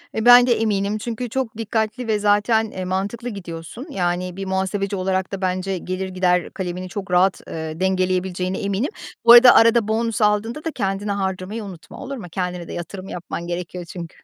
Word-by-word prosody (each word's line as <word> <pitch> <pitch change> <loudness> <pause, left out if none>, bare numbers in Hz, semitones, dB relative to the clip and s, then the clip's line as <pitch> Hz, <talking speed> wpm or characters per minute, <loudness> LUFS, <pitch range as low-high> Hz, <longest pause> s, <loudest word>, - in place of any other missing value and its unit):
E, 220 - -1
bende 245 0 +8
eminim 205 -1 0
çünkü 235 +2 -4
çok 240 -2 -3
dikkatli 225 +2 -2
ve 215 -1 +1
zaten, 210 +2 +2
eee, 185 -1 -5
mantıklı 200 +6 -3
gidiyorsun. 180 - -8
Yani, 180 -5 -2
bir 195 - -4
muhasebeci 190 +1 -1
olarak 190 0 -1
da 195 -1 -5
bence 185 +1 -1
gelir 185 +2 -4
gider 180 -1 +1
kalemini 185 0 -5
çok 195 0 -6
rahat, 180 +2 +3
eee, 160 0 -5
dengeleyebileceğine 185 0 0
eminim. 200 +5 -1 0.4
Bu - - +9
arada, 240 +1 +10
arada 230 -1 +5
bonus 225 +1 -1
aldığında 215 +7 +1
da 325 - -2
kendine 200 -4 -2
harcamayı 195 +2 -3
unutma 185 -5 -10
olur 275 0 -5
mu? 215 - -8
Kendine 180 -1 -3
de - - -7
yatırım 185 +3 -7
yapman 170 0 -6
gerekiyor 175 0 -5
çünkü. 170 -1 -9
195 Hz, 175 wpm, -21 LUFS, 185-220 Hz, 0.4 s, arada